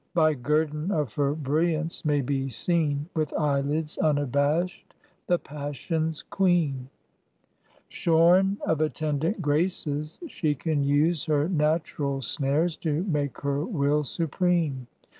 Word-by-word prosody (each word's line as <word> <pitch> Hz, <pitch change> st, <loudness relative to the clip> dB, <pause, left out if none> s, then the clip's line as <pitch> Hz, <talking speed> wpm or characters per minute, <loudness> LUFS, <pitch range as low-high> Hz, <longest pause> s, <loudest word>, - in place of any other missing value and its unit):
By 155 Hz, -2 st, +4 dB
guerdon 150 Hz, +4 st, 0 dB
of 150 Hz, -, -1 dB
her 145 Hz, 0 st, 0 dB
brilliance 160 Hz, +2 st, -1 dB
may 150 Hz, -2 st, +2 dB
be 135 Hz, 0 st, -1 dB
seen 150 Hz, +1 st, 0 dB
With 155 Hz, -2 st, -1 dB
eyelids 150 Hz, +1 st, -1 dB
unabashed 145 Hz, +4 st, 0 dB, 0.3 s
the 175 Hz, -, +3 dB
passion's 150 Hz, +2 st, -4 dB
Queen. 160 Hz, -9 st, +1 dB, 1.0 s
Shorn 175 Hz, +4 st, +3 dB
of 160 Hz, -1 st, +1 dB
attendant 155 Hz, +4 st, -1 dB
Graces 150 Hz, 0 st, -1 dB
she 155 Hz, -, -1 dB
can 150 Hz, 0 st, -1 dB
use 145 Hz, +3 st, +2 dB
Her 150 Hz, -1 st, +1 dB
natural 150 Hz, -4 st, 0 dB
snares 150 Hz, +6 st, 0 dB
to 160 Hz, +1 st, -1 dB
make 150 Hz, -7 st, -2 dB
her 140 Hz, +1 st, -1 dB
will 150 Hz, -6 st, +1 dB
supreme. 165 Hz, -3 st, 0 dB
150 Hz, 115 wpm, -26 LUFS, 145-165 Hz, 1.0 s, By